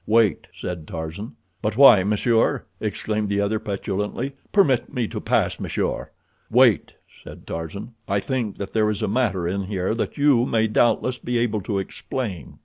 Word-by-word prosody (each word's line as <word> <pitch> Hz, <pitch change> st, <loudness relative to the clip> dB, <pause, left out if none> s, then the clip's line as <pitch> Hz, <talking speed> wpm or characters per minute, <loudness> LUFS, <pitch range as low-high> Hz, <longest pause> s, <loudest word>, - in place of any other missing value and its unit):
"Wait," 110 Hz, -4 st, +3 dB
said 85 Hz, -4 st, -6 dB
Tarzan. 80 Hz, +7 st, -6 dB, 0.3 s
"But 105 Hz, +1 st, -2 dB
why, 120 Hz, -9 st, +8 dB
monsieur?" 110 Hz, +3 st, +1 dB
exclaimed 105 Hz, -1 st, -2 dB
the 100 Hz, 0 st, 0 dB
other 100 Hz, +2 st, 0 dB
petulantly. 105 Hz, +4 st, -3 dB, 0.2 s
"Permit 145 Hz, -, +3 dB
me 120 Hz, -3 st, -1 dB
to -, -, -5 dB
pass, -, -, +1 dB
monsieur." -, -, -2 dB, 0.4 s
"Wait," 120 Hz, -4 st, +4 dB, 0.3 s
said -, -, -11 dB
Tarzan. 100 Hz, +8 st, -6 dB
"I 100 Hz, 0 st, +1 dB
think 120 Hz, -1 st, -3 dB
that 100 Hz, -, -6 dB
there 110 Hz, -1 st, +2 dB
is 105 Hz, -2 st, -2 dB
a -, -, +1 dB
matter 100 Hz, -6 st, 0 dB
in 95 Hz, +2 st, -2 dB
here 95 Hz, 0 st, -1 dB
that 115 Hz, -, -3 dB
you 140 Hz, -5 st, +4 dB
may 110 Hz, -1 st, +2 dB
doubtless 120 Hz, +3 st, +2 dB
be 120 Hz, 0 st, -2 dB
able 115 Hz, -3 st, 0 dB
to 100 Hz, +1 st, -2 dB
explain." 95 Hz, -, -5 dB
105 Hz, 165 wpm, -23 LUFS, 100-120 Hz, 0.4 s, why